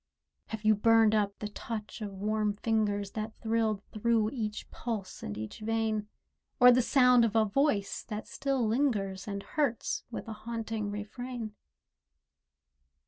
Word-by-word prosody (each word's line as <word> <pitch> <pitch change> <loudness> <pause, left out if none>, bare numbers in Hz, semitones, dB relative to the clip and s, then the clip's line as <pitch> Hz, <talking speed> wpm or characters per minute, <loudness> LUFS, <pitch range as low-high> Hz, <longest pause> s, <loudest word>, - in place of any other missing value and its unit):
Have 220 -1 -6
you 215 - +7
burned 225 +1 +5
up 205 -2 +1
the 210 - -4
touch 215 +1 -6
of 210 - -3
warm 210 +1 0
fingers 205 -2 0
That 215 0 -4
thrilled 220 -2 0
through 225 0 +2
each 215 -5 -4
pulse 215 -6 -5
and 105 - -5
each 110 0 -6
vein, 220 -1 -1 0.5
Or 250 -1 +9
the 250 +1 +5
sound 250 -1 +5
of 230 -1 +1
a 220 -1 +5
voice 215 -2 +1
that 215 -1 -5
still 270 -4 -1
lingers 215 -6 0
And 200 -1 -4
hurts 280 -7 -1
with 235 - -6
a 225 - -4
haunting 220 -1 -4
refrain? 220 +2 -5
220 Hz, 145 wpm, -30 LUFS, 210-230 Hz, 0.5 s, Or